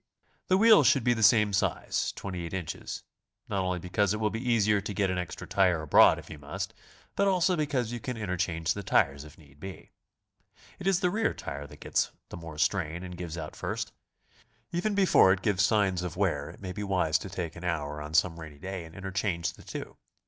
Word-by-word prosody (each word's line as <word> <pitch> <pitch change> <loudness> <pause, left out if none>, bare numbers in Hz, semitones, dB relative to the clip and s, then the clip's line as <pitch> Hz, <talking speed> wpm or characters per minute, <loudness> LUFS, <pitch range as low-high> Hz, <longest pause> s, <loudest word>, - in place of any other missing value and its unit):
The 185 - +4
wheels 215 - +7
should 135 - +4
be 120 - +4
the 115 - -3
same 105 -2 +5
size, 95 - 0
28 90 -2 -5
in., 90 -5 -5 0.6
not 100 - -1
only 90 -1 -1
because 95 +3 0
it - - -4
wild 110 -1 0
be 115 - -2
easier 105 -4 +2
to 100 +1 -5
get 100 -2 +1
an 90 - -1
extra 90 - -5
tire 90 -5 +2
abroad 75 - +6
if - - -10
you 80 - -9
must, 75 +1 -5 0.4
but 200 - +2
also 185 -1 +3
because 140 -7 -1
you 120 - -4
can 125 +1 -5
interchange 90 -5 -1
the 100 - -5
tires 70 -6 +2
if 75 0 -14
need 70 -2 -19
be. 95 +3 -9 0.9
It 185 - -4
is 195 -1 +3
the 180 -2 +2
rear 225 +3 0
tire 70 0 -6
that - - -15
gets - - +1 0.2
the - - -7
more 80 -2 -9
strain 85 +1 0
and 90 -1 -7
gives 85 -2 -6
out 80 -2 -6
first. - - -4 0.8
Even 190 +5 0
before 190 - +6
it 95 - -5
gives 100 -4 +2
signs 100 -3 +2
of 90 -2 -5
wear, - - 0
it - - -13
may 95 -2 -5
be 105 - -5
wise 90 -6 +1
to 95 - -7
take 90 -4 -4
an 85 - -9
hour 75 -4 -2
on 75 +1 -6
some 85 0 +3
rainy 80 -2 -9
day 95 +2 -6
and 80 - -13
interchange 95 -2 -2
the - - -16
two. - - -7
95 Hz, 215 wpm, -29 LUFS, 85-110 Hz, 0.9 s, wheels